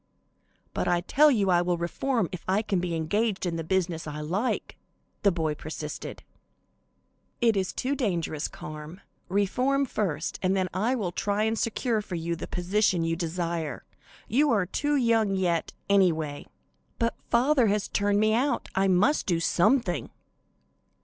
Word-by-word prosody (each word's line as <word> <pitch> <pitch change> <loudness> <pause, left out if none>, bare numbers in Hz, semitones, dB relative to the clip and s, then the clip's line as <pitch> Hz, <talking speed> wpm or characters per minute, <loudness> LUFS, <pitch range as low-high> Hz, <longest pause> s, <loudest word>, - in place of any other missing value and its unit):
"But - - -1
I 175 -1 +2
tell 295 +11 +5
you 205 -8 +2
I 175 -1 +4
will 175 0 0
reform 220 +6 -1
if 180 - -7
I 195 +4 +2
can 195 -4 0
be 175 -1 -2
engaged 195 +6 0
in 170 -2 -1
the 165 - -3
business 170 -2 -1
I 150 0 -5
like," 185 +11 -2 0.5
the 200 - +4
boy 160 -3 -1
persisted. 150 0 -7 1.2
"It 230 -3 +3
is 190 -2 0
too 265 +2 -2
dangerous, 175 - -1
Carm. 155 +4 -9 0.3
Reform 250 +9 +1
first, 165 - -2
and 190 +1 +1
then 185 -1 0
I 220 +8 +1
will 200 -8 -2
try 205 +3 0
and 220 0 +1
secure 230 0 0
for 200 -3 -6
you 170 0 -2
the - - -6
position 180 -1 +1
you 165 0 0
desire. 170 -2 -3 0.4
You 290 +7 +3
are 205 -7 +2
too 290 +10 0
young 225 -6 +2
yet, 175 -3 0 0.2
anyway." 160 -7 +2 0.5
"But 230 -1 +1 0.2
father 250 +1 +4
has 205 0 +1
turned 205 0 +1
me 215 0 +3
out, 250 +2 0
I 195 0 +2
must 195 +11 +3
do 170 -3 +2
something." 180 +4 +2
190 Hz, 160 wpm, -27 LUFS, 170-225 Hz, 1.2 s, tell